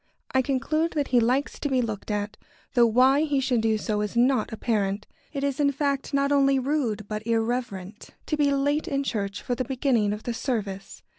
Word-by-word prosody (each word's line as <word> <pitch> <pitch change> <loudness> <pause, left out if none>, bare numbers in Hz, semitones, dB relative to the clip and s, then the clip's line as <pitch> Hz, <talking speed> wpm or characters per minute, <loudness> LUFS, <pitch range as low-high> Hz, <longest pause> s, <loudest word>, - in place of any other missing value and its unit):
I 260 - +3
conclude 310 +5 0
that 290 -2 -1
he 250 - +4
likes 250 +5 0
to 290 - -2
be 260 -1 +2
looked 220 -4 -3
at, 205 0 -2 0.4
though 240 -1 +5
why 260 +5 +4
he 295 -3 +1
should 255 -3 +1
do 220 -1 +2
so 210 0 -1
is 210 +3 -3
not 245 -1 +3
apparent. 210 -3 -1 0.3
It 280 -2 -4
is, 280 -1 -1
in 285 -1 +3
fact, 280 -1 -1
not 280 0 +1
only 275 -1 +4
rude, 250 -7 -1
but 215 +1 -5
irreverent, 225 -4 -2 0.2
to 305 - -1
be 295 -1 +2
late 285 +2 +1
in 275 -1 0
church 200 -6 -3
for 245 - -1
the 255 - -1
beginning 250 -5 +1
of 210 +1 -5
the 240 - -2
service. 205 -6 -4
250 Hz, 205 wpm, -26 LUFS, 215-275 Hz, 0.4 s, though